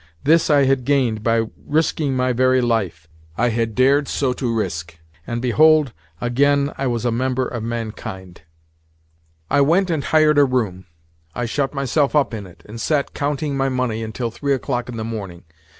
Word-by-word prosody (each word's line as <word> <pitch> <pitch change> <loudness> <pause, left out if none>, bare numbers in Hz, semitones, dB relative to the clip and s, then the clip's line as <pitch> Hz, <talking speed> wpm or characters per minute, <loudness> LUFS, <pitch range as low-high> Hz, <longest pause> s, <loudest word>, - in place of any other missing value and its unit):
This 165 +3 +3
I 145 -2 +5
had 135 -1 +1
gained 125 -6 +1
by 115 0 +1 0.2
risking 150 -2 0
my 125 0 +1
very 130 +1 +3
life. 105 -9 -1 0.3
I 120 +2 +2
had 115 -1 -1
dared 135 +2 +3
so 130 -3 0
to 125 -2 -2
risk, 85 -7 -3 0.3
and 120 +1 -3
behold, 150 +1 +4 0.3
again 140 +3 +1
I 135 - -2
was 120 -1 -2
a 120 - +2
member 130 +2 -1
of 120 - -5
mankind! 110 -5 -6 1.1
I 145 - +4
went 175 +6 +3
and 155 -4 -1
hired 155 -2 +4
a - - +7
room, 110 -8 -2 0.5
I 120 - -2
shut 135 +4 -2
myself 140 +2 0
up 145 -5 +2
in 105 -3 -6
it, 90 - -18
and 115 +2 -8
sat 150 -3 0
counting 145 0 -2
my 135 0 0
money 125 -4 -1
until 115 +2 -4
three 140 +4 -1
o'clock 125 -1 -3
in 120 - -6
the 110 - -3
morning. 100 -6 -6
125 Hz, 180 wpm, -20 LUFS, 115-140 Hz, 1.1 s, a